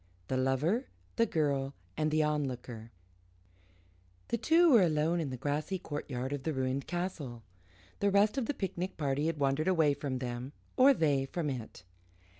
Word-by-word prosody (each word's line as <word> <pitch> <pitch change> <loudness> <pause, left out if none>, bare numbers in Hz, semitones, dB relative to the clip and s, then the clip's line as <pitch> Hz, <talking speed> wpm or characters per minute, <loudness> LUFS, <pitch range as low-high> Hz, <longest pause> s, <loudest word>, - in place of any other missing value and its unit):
THE 130 - +1
LOVER, 145 - +1 0.3
THE 230 0 +3
GIRL, 140 -3 0 0.2
AND 155 0 +1
THE 155 0 +2
ONLOOKER 125 -6 -3 1.4
The - - +1
two 330 +6 +5
were 235 -5 +7
alone 165 0 +2
in 155 -4 -2
the 130 - -5
grassy 150 +8 -2
courtyard 145 -5 -4
of 145 - -3
the 160 +3 -2
ruined 130 0 -1
castle. 165 -10 -4 0.6
The 200 - +3
rest 200 +3 +4
of 260 -5 -1
the 290 - -1
picnic 185 -2 -3
party 145 0 0
had 165 -1 -1
wandered 140 +3 +1
away 160 -6 +4
from 140 -2 -3
them, 125 +2 -5 0.2
or 270 +1 +7
they 140 - +2
from 150 0 -2
it. 115 -7 -7
150 Hz, 165 wpm, -32 LUFS, 135-180 Hz, 1.4 s, were